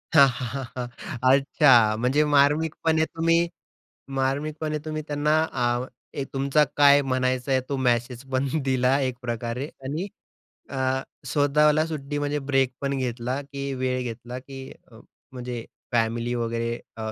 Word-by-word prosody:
हां, 140 -3 +9
हां, 125 0 -4
हां, 135 -1 -3
हां. 125 -1 -3 0.5
अच्छा. 130 -6 +5
म्हणजे 130 +6 +2
मार्मिकपणे 160 +2 +3
तुम्ही 165 +1 +2 0.8
मार्मिकपणे 150 +3 -1
तुम्ही 155 0 -3
त्यांना 150 +1 +1 0.2
अ, 120 0 0 0.3
एक 140 -2 -4
तुमचा 140 +2 +3
काय 145 0 +7
म्हणायचं 130 0 0
आहे, 130 -1 +3
तो 140 - -1
मेसेज 125 -1 0
पण 130 +1 +1 0.2
दिला 130 +1 +2
एक 130 -2 -1
प्रकारे 120 +1 -3 0.2
आणि 155 +8 -3 0.6
अ, 135 - -5 0.5
स्वतःला 150 +1 +3
सुट्टी 145 -2 -4
म्हणजे 145 0 -1
ब्रेक 135 -1 +3
पण 140 0 -1
घेतला, 125 +1 -2
की 140 0 -5
वेळ 130 -1 -1
घेतला, 120 +1 -6
की 135 +1 -10 0.3
अ, - - -14 0.3
म्हणजे 125 -2 -5 0.3
फॅमिली 120 +1 0
वगैरे 115 0 -2 0.2
अ, 110 0 -4
135 Hz, 140 wpm, -25 LUFS, 125-145 Hz, 0.8 s, हां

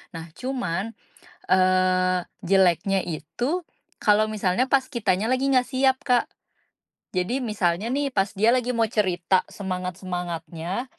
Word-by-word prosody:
Nah, 165 0 -7
cuman, 230 -6 -3 0.6
eee, 185 0 +3 0.3
jeleknya 190 0 +3
itu 240 - -3 0.4
kalau 210 +1 +4
misalnya 210 +3 +1
pas 270 -1 +3
kitanya 215 -3 0
lagi 260 +1 +1
enggak 255 -1 +3
siap, 265 0 +2
Kak. 250 -3 +3 0.9
Jadi 185 +8 0
misalnya 205 -2 0
nih 280 0 0
pas 195 -1 +1
dia 215 +3 +3
lagi 250 -1 +1
mau 230 -1 +3
cerita 185 -3 +1
semangat-semangatnya, 180 0 -4
195 Hz, 120 wpm, -24 LUFS, 180-245 Hz, 0.9 s, kalau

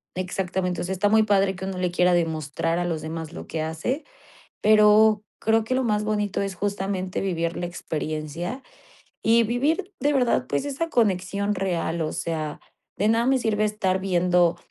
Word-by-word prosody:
Exactamente. 180 -1 -2
O - - -2
sea, 190 +2 -2
está 205 +2 +1
muy 220 0 +5
padre 195 -2 +2
que 190 - -6
uno 190 -1 -4
le 180 -1 0
quiera 180 0 +3
demostrar 165 0 0
a 175 - -1
los 165 -3 -2
demás 160 0 -6
lo - - -7
que 160 - -3
hace, 160 - -3 0.6
pero 215 0 +5 0.2
creo 225 0 +2
que 255 +4 -1
lo 260 - +1
más 210 -2 +1
bonito 210 -2 -1
es 195 -2 -3
justamente 195 -1 -2
vivir 170 -3 -1
la 175 - -2
experiencia 165 - -4 0.6
y 230 +1 +5
vivir 290 - 0
de 290 +1 +2
verdad, 240 - +2
pues, 145 - -1
esa 290 +4 -2
conexión 200 - +1
real. 170 -3 -1
O 155 - -2
sea, 155 -2 -3 0.4
de 210 +3 +1
nada 230 +1 +2
me 265 0 +3
sirve 215 -3 0
estar 195 -3 0
viendo 180 -2 +2
190 Hz, 180 wpm, -24 LUFS, 175-215 Hz, 0.6 s, muy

